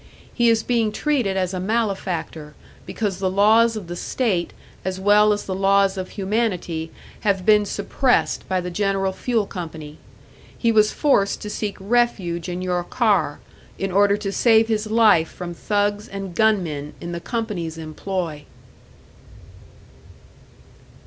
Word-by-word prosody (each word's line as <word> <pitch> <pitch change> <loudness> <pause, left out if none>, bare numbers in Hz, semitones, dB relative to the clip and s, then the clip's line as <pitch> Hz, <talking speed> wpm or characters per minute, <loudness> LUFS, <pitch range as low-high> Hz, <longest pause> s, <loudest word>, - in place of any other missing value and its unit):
He 240 -1 +3
is 225 -1 +2
being 230 -3 +1
treated 235 -5 0
as 185 0 -1
a 185 - -2
malefactor, 185 -7 -2 0.3
because 200 -4 -3
the 190 -1 0
laws 220 +4 +4
of 210 -4 -5
the 175 +1 -6
state, 190 -3 -1 0.3
as 190 0 -3
well 210 +2 +5
as 205 0 -1
the 190 - -3
laws 195 0 +3
of 185 -1 -5
humanity, 190 -6 -2 0.3
have 195 -4 0
been 210 -1 +4
suppressed 245 +6 0
by 185 -1 +1
the 180 0 -5
General 195 0 0
Fuel 230 0 -1
Company; 160 -5 -8 0.6
he 230 - +2
was 215 -1 +4
forced 205 -9 +2
to 210 - -5
seek 210 -1 -4
refuge 190 -6 0
in 180 +1 -4
your 180 -1 -1
car, 195 - +1 0.4
in 195 -1 -2
order 200 +2 +4
to 205 -2 -4
save 225 +1 +4
his 215 -1 -1
life 215 -8 +4
from 175 -1 -7
thugs 205 +3 -1
and 195 -3 -6
gunmen 170 -9 0
in 170 - -6
the 170 - -4
company's 200 -9 -4
employ!" 160 0 -4
195 Hz, 145 wpm, -22 LUFS, 180-215 Hz, 0.6 s, well